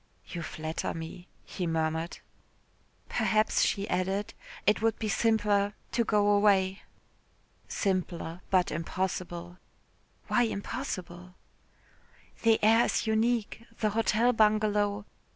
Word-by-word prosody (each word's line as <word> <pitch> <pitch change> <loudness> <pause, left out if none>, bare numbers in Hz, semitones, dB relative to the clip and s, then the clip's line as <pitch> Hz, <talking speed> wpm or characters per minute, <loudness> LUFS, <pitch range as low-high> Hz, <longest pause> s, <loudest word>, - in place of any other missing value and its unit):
"You 170 - -5
flatter 155 0 -4
me," 165 +2 -8 0.2
he 180 - -4
murmured. 160 +1 -1 0.9
"Perhaps," 215 0 +2
she 200 0 +1
added, 190 +3 -1 0.3
"it 210 +2 +3
would 225 0 +1
be 220 - -3
simpler 205 -2 +2 0.2
to 235 - +2
go 210 -2 +2
away." 200 -2 +3 0.9
"Simpler 180 -3 -2
but 185 -2 +2
impossible." 175 +1 -4 0.7
"Why 245 - +2
impossible?" 185 -6 -4 1.1
"The 225 -1 +5
air 225 +2 +6
is - - 0
unique. 225 0 0 0.2
The 215 -1 +1
Hotel 225 +2 +2
Bungalow...." 210 -2 +2
200 Hz, 105 wpm, -29 LUFS, 180-220 Hz, 1.1 s, air